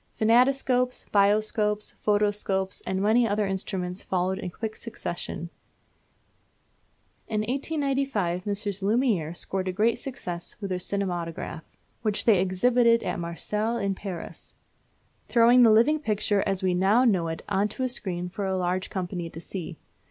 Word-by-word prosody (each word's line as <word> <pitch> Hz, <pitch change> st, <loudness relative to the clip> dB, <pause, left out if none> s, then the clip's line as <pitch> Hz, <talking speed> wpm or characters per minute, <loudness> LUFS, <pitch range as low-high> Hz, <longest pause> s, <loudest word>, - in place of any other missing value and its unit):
Phantoscopes, 250 Hz, +2 st, +3 dB
Bioscopes, 210 Hz, +1 st, +2 dB
Photoscopes, 205 Hz, -2 st, +1 dB
and 190 Hz, +1 st, -1 dB
many 230 Hz, +3 st, +4 dB
other 210 Hz, 0 st, +1 dB
instruments 190 Hz, -1 st, -3 dB
followed 185 Hz, +1 st, -1 dB
in 180 Hz, -, -4 dB
quick 220 Hz, +4 st, -5 dB
succession. 175 Hz, -6 st, -5 dB, 1.8 s
In 215 Hz, -1 st, -1 dB
1895 270 Hz, -, -1 dB
Messrs. 200 Hz, -1 st, -2 dB
Lumière 200 Hz, -, +1 dB
scored 190 Hz, -1 st, -3 dB
a -, -, 0 dB
great 220 Hz, +5 st, +1 dB
success 180 Hz, -11 st, -6 dB
with 200 Hz, -2 st, -4 dB
their 180 Hz, -, -1 dB
Cinematograph, 175 Hz, -4 st, -4 dB, 0.2 s
which 215 Hz, -2 st, 0 dB
they 215 Hz, -6 st, +5 dB
exhibited 230 Hz, +5 st, +3 dB
at -, -, -2 dB
Marseilles 210 Hz, +7 st, -2 dB
and 195 Hz, -1 st, 0 dB
Paris; 185 Hz, -3 st, -8 dB, 0.7 s
throwing 240 Hz, +1 st, +6 dB
the 235 Hz, -, +7 dB
living 235 Hz, +8 st, +5 dB
picture 210 Hz, -5 st, +1 dB
as 195 Hz, -1 st, 0 dB
we 185 Hz, -1 st, +2 dB
now 195 Hz, +7 st, +4 dB
know 185 Hz, -8 st, +2 dB
it 165 Hz, 0 st, -5 dB
on 200 Hz, +1 st, +1 dB
to 240 Hz, +5 st, -5 dB
a -, -, +2 dB
screen 185 Hz, -8 st, -3 dB
for 195 Hz, +2 st, -4 dB
a 190 Hz, 0 st, 0 dB
large 185 Hz, +1 st, -1 dB
company 180 Hz, -3 st, -4 dB
to 165 Hz, -, -9 dB
see. 170 Hz, -1 st, -7 dB
200 Hz, 145 wpm, -26 LUFS, 185-230 Hz, 1.8 s, the